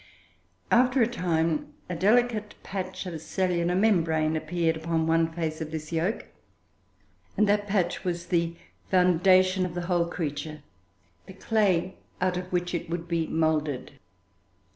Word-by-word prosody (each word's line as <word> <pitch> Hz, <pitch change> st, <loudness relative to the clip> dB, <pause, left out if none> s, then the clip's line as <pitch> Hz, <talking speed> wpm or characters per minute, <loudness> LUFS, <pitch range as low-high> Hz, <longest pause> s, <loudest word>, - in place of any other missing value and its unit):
After 250 Hz, +1 st, +4 dB
a -, -, +3 dB
time, 165 Hz, -8 st, -1 dB
a 180 Hz, -, -4 dB
delicate 215 Hz, +3 st, +2 dB
patch 190 Hz, -1 st, -5 dB
of 165 Hz, -4 st, -6 dB
cellular 180 Hz, -1 st, 0 dB
membrane 165 Hz, -6 st, +2 dB
appeared 160 Hz, +1 st, 0 dB
upon 160 Hz, 0 st, -1 dB
one 165 Hz, 0 st, +2 dB
face 160 Hz, -1 st, -3 dB
of 155 Hz, -, -4 dB
this 155 Hz, 0 st, -6 dB
yolk, 170 Hz, +7 st, -1 dB, 1.1 s
and 210 Hz, -, +4 dB
that 205 Hz, 0 st, +2 dB
patch 195 Hz, -4 st, 0 dB
was 175 Hz, -1 st, -2 dB
the 170 Hz, -1 st, 0 dB, 0.3 s
foundation 185 Hz, +1 st, +4 dB
of 180 Hz, -2 st, -3 dB
the 175 Hz, -, -2 dB
whole 175 Hz, -1 st, +1 dB
creature, 155 Hz, -2 st, -4 dB, 0.6 s
the 190 Hz, -, -10 dB
clay 190 Hz, -3 st, +1 dB, 0.2 s
out 185 Hz, 0 st, +1 dB
of 180 Hz, 0 st, -5 dB
which 175 Hz, 0 st, -1 dB
it 170 Hz, -, -3 dB
would 170 Hz, 0 st, -4 dB
be 165 Hz, -2 st, 0 dB
moulded. 155 Hz, -4 st, -1 dB
175 Hz, 140 wpm, -27 LUFS, 160-185 Hz, 1.1 s, After